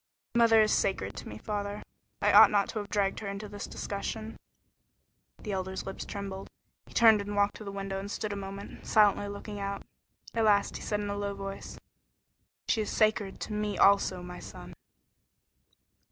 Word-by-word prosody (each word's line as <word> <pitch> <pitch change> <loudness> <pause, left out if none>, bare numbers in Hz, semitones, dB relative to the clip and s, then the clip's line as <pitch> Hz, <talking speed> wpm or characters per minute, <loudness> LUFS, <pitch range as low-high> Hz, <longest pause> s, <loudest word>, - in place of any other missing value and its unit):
"Mother 230 -2 +6
is 215 - +1
sacred 100 - 0
to - - -7
me, 105 - -7
father. 205 - -4 0.4
I - - +5
ought - - +10
not 200 -1 +2
to 220 - -3
have 205 -1 -6
dragged 200 -2 0
her 210 - -6
into 200 +2 -5
this 205 0 -7
discussion." 220 +2 -5 1.0
The 210 - -5
Elder's 190 -1 -3
lips 195 - -6
trembled. 195 -1 -6 0.4
He - - -15
turned 220 -3 +7
and 205 0 -5
walked 205 0 +2
to - - -9
the 200 - -6
window 195 -1 -4
and 200 +1 -6
stood 210 0 -3
a - - -4
moment, 195 0 -7
silently 205 -1 +4
looking 205 +1 -7
out. 200 0 -4 0.5
At 225 -1 +2
last 205 -1 +3
he - - -11
said 210 -1 -1
in 205 - -3
a - - -2
low 200 0 -3
voice: 195 0 -7 0.9
"She 225 - +2
is 210 - -3
sacred 215 -3 +1
to 215 - -4
me 210 -1 -2
also, 195 -2 +4
my 180 0 -8
son." - - -10
200 Hz, 185 wpm, -30 LUFS, 195-210 Hz, 1.0 s, ought